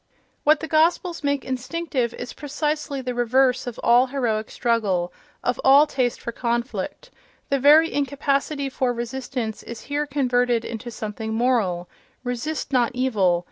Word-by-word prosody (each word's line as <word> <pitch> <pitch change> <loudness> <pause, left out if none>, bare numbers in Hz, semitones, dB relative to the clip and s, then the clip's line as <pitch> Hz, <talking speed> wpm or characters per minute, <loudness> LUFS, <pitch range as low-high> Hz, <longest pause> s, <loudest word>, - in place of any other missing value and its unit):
What 305 +1 +4
the 320 - -4
Gospels 335 +2 +2
make 285 -1 0
instinctive 260 -1 -2
is 245 - -7
precisely 295 -1 -3
the 250 -1 -2
reverse 250 +2 +2
of 245 - -6
all 245 +2 +5
heroic 235 -5 -1
struggle, 200 -7 0 0.3
of 245 - -1
all 275 +3 +7
taste 255 -5 -1
for 235 - -5
conflict: 235 +1 -3 0.4
the 275 - +2
very 305 +4 +6
incapacity 280 0 0
for 255 -2 -1
resistance 240 -1 -4
is 235 -2 -8
here 290 +3 -2
converted 245 -4 +1
into 235 +1 -6
something 220 0 -5
moral: 220 -8 +1 0.4
("resist 260 +4 -3
not 245 -2 +3
evil!" 205 -9 +2
255 Hz, 140 wpm, -23 LUFS, 235-285 Hz, 0.4 s, all